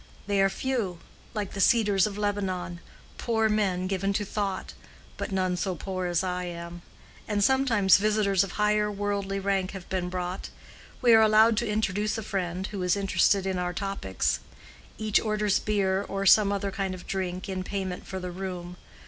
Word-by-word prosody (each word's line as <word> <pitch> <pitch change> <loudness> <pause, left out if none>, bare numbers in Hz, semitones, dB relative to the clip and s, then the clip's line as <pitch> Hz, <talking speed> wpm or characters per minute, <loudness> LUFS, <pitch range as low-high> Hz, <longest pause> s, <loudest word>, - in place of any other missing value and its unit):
They 200 -1 +1
are 195 - +4
few—like 205 -3 -4
the 195 - -5
cedars 205 -3 +4
of 205 -1 -6
Lebanon—poor 205 +3 -2
men 195 -4 +1
given 195 +1 -1
to 205 +1 -1
thought. 200 -2 -3 0.4
But - - -5
none 185 -1 0
so 185 +1 -2
poor 185 +1 -3
as 175 +1 +1
I 180 -1 -2
am: 170 0 -7 0.5
and 205 -1 +1
sometimes 235 -7 +4
visitors 205 -2 +2
of 195 - -6
higher 210 0 +2
worldly 200 -1 -2
rank 195 -1 -1
have 190 -3 -8
been 185 -1 -1
brought. 180 0 -4 0.5
We 240 -2 +7
are 220 - +8
allowed 220 +1 +6
to 235 0 0
introduce 210 0 0
a 220 - -4
friend, 185 -2 -3
who 200 -2 -5
is 180 0 +2
interested 195 0 +2
in 190 -1 -1
our 180 0 -2
topics. 195 - -1 0.6
Each 215 -2 +2
orders 210 -2 +1
beer 195 -2 +1
or 195 0 -2
some 200 0 +6
other 200 0 -1
kind 195 -1 -2
of 180 - -11
drink, 185 -1 -3
in 190 -1 -3
payment 190 -1 -4
for 190 - -4
the 180 -1 -5
room. 180 -1 -6
195 Hz, 175 wpm, -27 LUFS, 185-210 Hz, 0.6 s, are